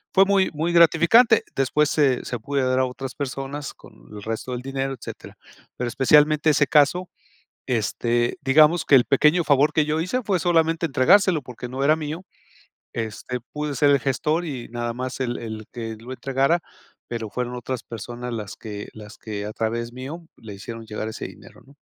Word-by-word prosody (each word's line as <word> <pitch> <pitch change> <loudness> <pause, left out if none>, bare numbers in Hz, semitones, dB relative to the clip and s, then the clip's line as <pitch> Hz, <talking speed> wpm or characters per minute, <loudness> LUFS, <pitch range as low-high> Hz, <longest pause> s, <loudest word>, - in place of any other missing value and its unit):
fue 195 0 +7
muy 195 -1 +3
muy 160 +3 -1
gratificante, 220 +7 +5
después 145 +3 +2
se 140 -6 +2
se 125 - -3
pude 140 +5 -1
a - - +1
dar 130 0 +1
a 130 - +3
otras 130 0 -6
personas 140 +1 -5
con - - -17 0.2
el 105 -1 -9
resto 115 +3 -4
del 125 - -4
dinero, 135 0 -3
etcétera, 125 - -10 0.4
pero 125 - -2
especialmente 150 +5 +4
ese 145 -1 +3
caso, 160 +5 +3 0.6
este, 120 - 0
digamos 155 +5 +4
que 140 - +6
el 125 - +5
pequeño 150 +5 +3
favor 145 0 +3
que 155 - +2
yo 155 +1 0
hice 185 +10 -1
fue 195 -4 0
solamente 165 -1 +2
entregárselo 160 +5 +4
porque 125 0 -8
no 130 +2 -3
era 150 +2 +5
mío, 160 +3 -6 0.7
este, 115 +2 -4
pude 150 -1 -3
ser 145 +3 +3
el 140 - +4
gestor 150 +6 0
y 130 -7 -5
nada 120 0 -3
más 130 +2 -5
el 120 -2 -2
el 110 -2 -7
que 115 -2 -5
lo 120 +3 -10
entregara, 135 +5 +1 0.5
pero, 115 -2 -4
fueron 125 +2 -4
otras 125 +1 -5
personas 120 +2 -7
las 105 -3 -5
que 105 -2 -7
las 105 0 -12
que 105 -2 -6
a 105 - -6
través 115 +2 -3
mío 140 +7 -7
le 105 -3 -10
hicieron 115 +3 -8
llegar 110 0 -5
ese 110 - -6
dinero, - - -15
¿no? 140 +2 -20
135 Hz, 190 wpm, -23 LUFS, 120-155 Hz, 0.7 s, fue